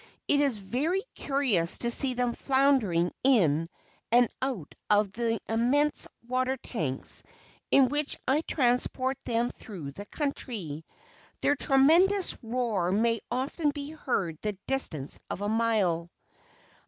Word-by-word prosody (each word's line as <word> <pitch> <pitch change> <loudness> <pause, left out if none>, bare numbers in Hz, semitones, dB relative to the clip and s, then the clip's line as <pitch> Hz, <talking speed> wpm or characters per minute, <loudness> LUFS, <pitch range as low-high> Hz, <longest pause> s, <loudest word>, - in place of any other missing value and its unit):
It 285 0 +3
is 275 -6 +1
very 280 - -1
curious 250 - +1
to 235 - +2
see 255 +1 +3
them 245 -1 0
floundering 260 -13 +2
in 165 - +3 0.4
and 240 0 +5
out 250 - -3 0.2
of 210 -1 +3
the 230 +1 -1
immense 265 +6 +2 0.2
water 255 +1 0
tanks 155 - -2 0.5
in 270 -2 +5
which 290 +2 -1
I 280 +4 +3
transport 255 -2 0
them 235 +1 0
through 170 -10 -9
the 205 +8 -10
country. 210 - -4 0.6
Their 290 - +3
tremendous 335 +9 +4
roar 225 -7 -1
may 230 +3 +2
often 270 +5 -1
be 285 0 -5
heard 195 - -2
the 210 -2 -3
distance 160 - +1
of - - -5
a 205 - -1
mile. 210 -7 +1
240 Hz, 130 wpm, -28 LUFS, 200-275 Hz, 0.6 s, and